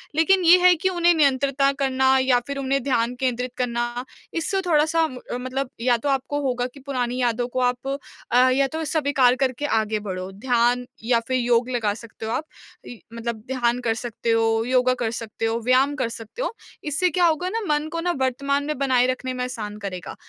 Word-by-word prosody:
लेकिन 365 +4 +4
ये 345 +2 +8
है 360 0 +6
कि 360 +3 0
उन्हें 345 -1 +3
नियंत्रता 275 -1 +2
करना 265 -1 +3
या 260 -1 +3
फिर 280 0 -4
उन्हें 275 0 0
ध्यान 240 -2 +1
केंद्रित 250 -1 -1
करना, 240 0 -2 0.3
इससे 375 +4 -1
थोड़ा-सा 320 0 +3
म 255 - -9 0.2
मतलब 255 +1 -3
या 240 0 +3
तो 260 +5 -3
आपको 275 +2 -1
होगा 250 -3 -1
कि 280 - -13
पुरानी 250 -3 -2
यादों 240 0 0
को 255 - -2
आप 250 +1 0 0.4
अ, 250 +2 +5
या 270 +2 +2
तो 320 0 -2
सविकार 280 -5 +2
करके 260 +1 -1
आगे 220 -5 0
बढ़ो, 185 -2 -5
ध्यान 245 +3 +1 0.2
या 235 0 +3
फिर 260 -1 +1
योग 240 0 +2
लगा 230 -5 0
सकते 225 0 -10
हो - - -3
आप। 280 +6 -2 0.4
इ 240 - -9 0.2
मतलब 230 -1 -5
ध्यान 245 -2 0
कर 230 -2 +1
सकते 230 0 -3
हो, 225 0 +2
योगा 255 0 +3
कर 225 -2 0
सकते 225 -1 -5
हो, 225 +1 0
व्यायाम 260 +3 +3
कर 255 -5 -1
सकते 230 - -8
हो, - - -2 0.3
इससे 300 +5 +1
क्या 355 +1 +2
होगा 335 +3 0
ना 455 +4 -2
मन 295 +1 -1
को 335 - -2
ना 355 +1 0
वर्तमान 280 +2 0
में 300 -1 -3
बनाए 260 -3 +3
रखने 255 0 -2
में 250 0 -3
आसान 210 -4 -6
करेगा। 185 -4 -6
255 Hz, 205 wpm, -23 LUFS, 235-280 Hz, 0.4 s, ये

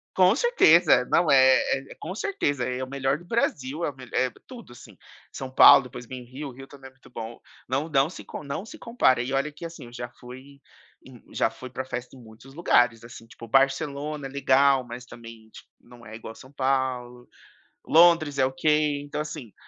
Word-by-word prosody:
Com 185 +3 +5
certeza. 175 - +4
Não, 170 +3 +2
eh 130 -1 +6 0.3
eh, - - -11
com - - -6
certeza 145 - -2
é 125 +1 -3
o 130 - -6
melhor 135 0 -1
do 175 - -16
Brasil, 160 - -2
é - - -1
o 140 - -11
me 130 - -11
eh, 130 -1 +1 0.2
tudo 240 - -12
assim. - - -15 0.3
São 130 -1 -7
Paulo, 135 - +8
depois 125 -1 -10
vem 130 -1 -8
Rio, 135 +3 -8
Rio 135 +2 -12
também 135 -2 -13
é - - -26
muito 130 -1 -21
bom. 115 -1 -8 0.3
Não 140 +5 -1
não 140 0 +2
se - - -11 0.2
não 145 +8 -5
se - - -11
compara, 180 - +2
e 130 +2 -4
olha 140 +3 -1
que 160 +3 -10
assim, 165 -6 -9
eu 120 - -14
já 120 0 -6
fui 130 +3 -14 0.5
em 130 -3 -15
já - - +1
fui 130 +3 -10
para 130 +1 -6
festa 125 0 -7
em - - -14
muitos 115 +3 -16
lugares, 120 -8 +2
assim, 115 -1 -12
tipo, 115 0 -12
Barcelona 140 +3 0
é - - -11
legal 135 0 +3
mas 120 +1 -9
também, 115 -2 -13
tipo, - - -15
não 120 0 -18
é 110 0 -10
igual 110 0 -9
São 130 - -15
Paulo. 130 -3 -2 0.6
Londres 160 -4 +4
é 130 - +4
ok, 150 0 0
então 145 +1 -5
assim 145 - -8
135 Hz, 205 wpm, -25 LUFS, 125-150 Hz, 0.6 s, Paulo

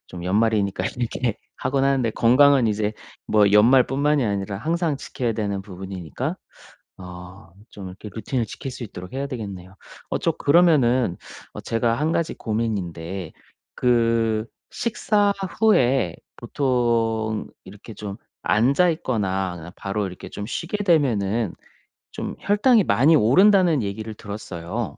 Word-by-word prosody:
좀 90 -1 -9
연말이니까 100 -1 +1
이렇게 120 -1 -2 0.2
하곤 135 +1 0
하는데 135 -4 +2
건강은 130 +2 +5
이제 105 0 -1 0.3
뭐 105 -2 +4
연말뿐만이 135 +5 +4
아니라 100 -1 -2
항상 165 - -1
지켜야 125 -3 -3
되는 100 -3 -2
부분이니까 95 -3 -6 0.6
아 90 -1 -11 0.2
좀 95 -2 -9
이렇게 100 +3 -9
루틴을 115 +2 -2
지킬 130 +5 -7
수 125 - -7
있도록 90 -2 -9
해야 135 +1 -2
되겠네요. 100 -8 -7 0.4
어 - - +1
저 - - +1
그러면은 135 - +3 0.4
어 - - -7
제가 115 0 0
1 150 +6 0
가지 165 -1 -1
고민인데 95 -6 -3 0.4
그 115 -2 +2 0.3
'식사 210 -3 +1 0.3
후에 130 - +3 0.2
보통 115 -5 0 0.2
이렇게 105 +4 -12
좀 100 -1 -7 0.3
앉아 140 +11 +3
있거나 95 - -1
그냥 85 +1 -10
바로 100 +1 -3
이렇게 90 - -9
좀 105 - -6
쉬게 195 - -3
되면은 115 - +1 0.6
좀 - - -5
혈당이 210 +2 +3
많이 150 +6 +4
오른다.'는 175 - +5
얘기를 110 +2 -5
들었어요. 100 -3 -6
115 Hz, 290 characters per minute, -23 LUFS, 100-135 Hz, 0.6 s, 건강은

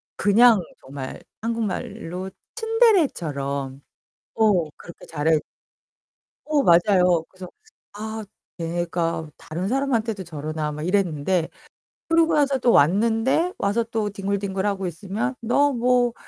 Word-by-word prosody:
그냥 220 0 +5 0.2
정말 135 0 -7 0.2
한국말로 205 -4 -3 0.3
츤데레처럼 165 - +1 0.5
어, 195 -8 +3
그렇게 170 - -12
잘해 155 0 +1 1.1
어, 300 -2 +2
맞아요. 180 -1 +4
그래서 185 -1 -10 0.5
'아, 220 +1 -5 0.4
얘가 165 -1 -2
다른 175 +5 -5
사람한테도 230 -6 0
저러나.' 155 -1 -4
막 150 +1 -6
이랬는데 180 -3 0 0.6
그러고 330 0 +4
나서 280 -2 +2
또 240 -1 +3
왔는데 225 - +3
와서 210 +4 +1
또 215 -2 -1
뒹굴뒹굴하고 195 0 -2
있으면 205 +9 -3
"너 280 +5 +3
뭐 245 0 +2
200 Hz, 245 characters per minute, -23 LUFS, 165-235 Hz, 1.1 s, 그냥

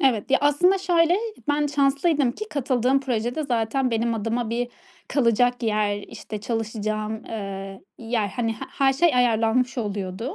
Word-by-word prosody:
Evet. 250 -6 +2
Ya, 270 - +5
aslında 350 +7 +4
şöyle, 350 -1 +3 0.3
ben 295 0 +2
şanslıydım 280 -1 +2
ki 430 - -6
katıldığım 265 -1 +1
projede 245 +2 -2
zaten 245 +1 0
benim 230 0 0
adıma 225 +1 -2
bir 240 +1 -1 0.4
kalacak 245 -1 +2
yer, 210 -2 +1
işte, 215 -1 -7
çalışacağım, 215 -1 -3
eee, 195 -2 -6 0.2
yer, 225 -3 -1
hani 225 +2 -2
he - - -9
her 270 -1 +2
şey 310 +2 +3
ayarlanmış 245 +1 +2
oluyordu. 205 +2 -3
240 Hz, 145 wpm, -24 LUFS, 220-275 Hz, 0.4 s, Ya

